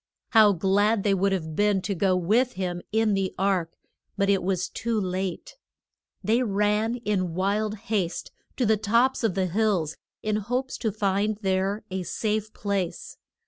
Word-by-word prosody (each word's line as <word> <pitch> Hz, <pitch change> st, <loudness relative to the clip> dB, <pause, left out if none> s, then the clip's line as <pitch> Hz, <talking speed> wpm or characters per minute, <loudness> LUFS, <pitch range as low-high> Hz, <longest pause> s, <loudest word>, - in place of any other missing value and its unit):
How 215 Hz, -3 st, +6 dB
glad 200 Hz, +4 st, +2 dB
they 205 Hz, -, +3 dB
would 195 Hz, +1 st, +2 dB
have 160 Hz, -5 st, -2 dB
been 205 Hz, 0 st, +3 dB
to 200 Hz, -, -1 dB
go 190 Hz, 0 st, +2 dB
with 220 Hz, +8 st, +2 dB
him 180 Hz, -2 st, -3 dB
in 220 Hz, 0 st, +2 dB
the 195 Hz, -1 st, -1 dB
ark. 185 Hz, -4 st, 0 dB, 0.4 s
But 200 Hz, 0 st, +3 dB
it 195 Hz, -, +2 dB
was 185 Hz, 0 st, -1 dB
too 230 Hz, -1 st, -2 dB
late. 185 Hz, -, -3 dB, 0.7 s
They 230 Hz, +3 st, +2 dB
ran 210 Hz, +1 st, +1 dB
in 185 Hz, -5 st, 0 dB
wild 205 Hz, +3 st, 0 dB
haste 205 Hz, -5 st, -2 dB, 0.3 s
to 250 Hz, -, +1 dB
the 220 Hz, 0 st, +3 dB
tops 235 Hz, +5 st, +2 dB
of 220 Hz, -6 st, +1 dB
the 190 Hz, -1 st, +1 dB
hills 185 Hz, -4 st, 0 dB, 0.3 s
in 215 Hz, 0 st, 0 dB
hopes 250 Hz, +5 st, -2 dB
to 220 Hz, -, 0 dB
find 205 Hz, +1 st, 0 dB
there 190 Hz, +2 st, 0 dB
a 190 Hz, 0 st, -2 dB
safe 215 Hz, +3 st, -2 dB
place. 200 Hz, -5 st, -3 dB
200 Hz, 165 wpm, -26 LUFS, 190-215 Hz, 0.7 s, How